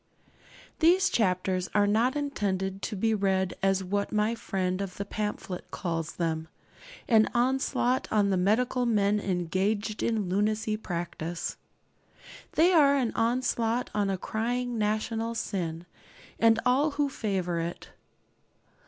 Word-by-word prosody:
These 360 +4 +5
chapters 185 -3 0
are 205 -1 +5
not 225 +6 +2
intended 195 -9 -2
to - - -3
be 225 +3 +1
read 190 -2 +1
as 195 0 +2
what 200 +2 -2
my 215 +1 +1
friend 185 -4 -2
of 195 -2 -5
the 200 - -3
pamphlet 210 -3 -4
calls 165 -3 -3
them 160 -2 -2 0.6
an 220 -2 +5
onslaught 255 0 +1
on 205 -2 +2
the - - +2
medical 240 +6 +1
men 210 -2 +2
engaged 195 +3 -1
in 220 -4 0
lunacy 215 +3 0
practice. 175 -4 -4 1.0
They 345 +4 +4
are 285 -4 +6
an 255 -5 +1
onslaught 235 0 0
on 205 -2 +1
a 190 - 0
crying 240 +4 -2
national 220 +2 -1
sin, 170 -6 -3 0.5
and 225 -1 +5
all 265 +5 +3
who 290 -1 +2
favour 190 -9 -2
it. 170 +1 -5
210 Hz, 130 wpm, -28 LUFS, 190-235 Hz, 1.0 s, are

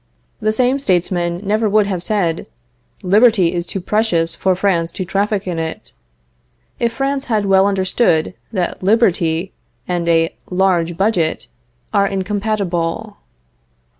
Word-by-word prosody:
The 215 0 +1
same 255 +4 +1
statesman 175 -5 0
never 215 +2 +1
would 210 0 +3
have 190 -3 -3
said: 175 -4 -1 0.5
"Liberty 200 -2 +4
is 175 -1 -3
too 195 - -4
precious 180 -4 +1
for 190 -1 +1
France 180 -3 +1
to 185 - -4
traffic 200 +2 -1
in 175 -3 -3
it," 160 0 -5 0.9
if 235 -1 +1
France 275 +2 -1
had 215 -3 0
well 195 0 +4
understood 190 -3 +1 0.2
that 185 -5 -2
liberty 185 -5 +1 0.3
and 175 -2 -2
a 165 -1 +2 0.2
large 180 -3 +1
budget 185 -5 0 0.4
are 200 -1 +3
incompatible. 195 -3 -2
190 Hz, 130 wpm, -18 LUFS, 175-215 Hz, 0.9 s, Liberty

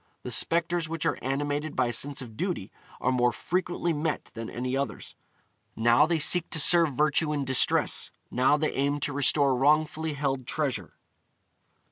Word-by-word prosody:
The 125 - -6
spectres 170 +5 +1
which 165 -2 -3
are - - 0
animated 145 +3 -3
by 130 - +2
a 120 - -2
sense 140 +3 -2
of 115 -3 -12
duty 175 - -4 0.3
are 125 - 0
more 125 -1 +2
frequently 175 +2 -2
met 155 +1 -3
than 115 0 -7
any 125 +2 -3
others: 135 -5 -4 0.6
now 120 +6 +4
they 165 0 +1
seek 170 +3 +3
to 160 - -1
serve 165 -2 +5
virtue 150 +2 +1
in 145 -2 -2
distress, 130 -1 +2 0.2
now 130 +4 +3
they 155 +1 -1
aim 140 +2 -1
to 145 - -2
restore 140 -1 +2
wrongfully 155 +3 +1
held 135 -3 -3
treasure. 130 - -3
145 Hz, 165 wpm, -27 LUFS, 130-155 Hz, 0.6 s, serve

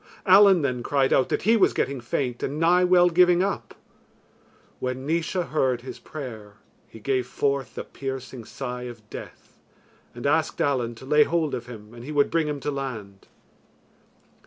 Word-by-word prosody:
Allen 190 -3 +7
then 125 -3 -1
cried 135 +1 +1
out 130 - +3
that - - -1
he 225 +3 +4
was 210 - +4
getting 140 -2 -2
faint 120 0 -2
and 145 +3 -3
nigh 175 +2 +4
well 180 -1 +5
giving 180 +1 +4
up. 200 0 -3 1.0
When 130 +1 -4
Naois 170 +3 -1
heard 130 -5 +1
his 130 - -9
prayer, 110 -9 -8 0.3
he 115 - -13
gave 130 +2 -1
forth 140 -1 -1
the - - -4
piercing 130 -3 -7
sigh 125 0 -6
of 115 -3 -13
death, - - -11 0.6
and 120 - -8
asked 150 +2 +1
Allen 125 -4 0
to 125 - -12
lay 150 +2 +4
hold 160 -2 -1
of 120 0 -4
him 110 -2 -11
and 120 0 -11
he 145 - -7
would 145 -1 +2
bring 165 -2 +1
him 145 -1 -3
to 145 +3 -2
land. 110 -8 -6
135 Hz, 175 wpm, -25 LUFS, 125-160 Hz, 1.0 s, Allen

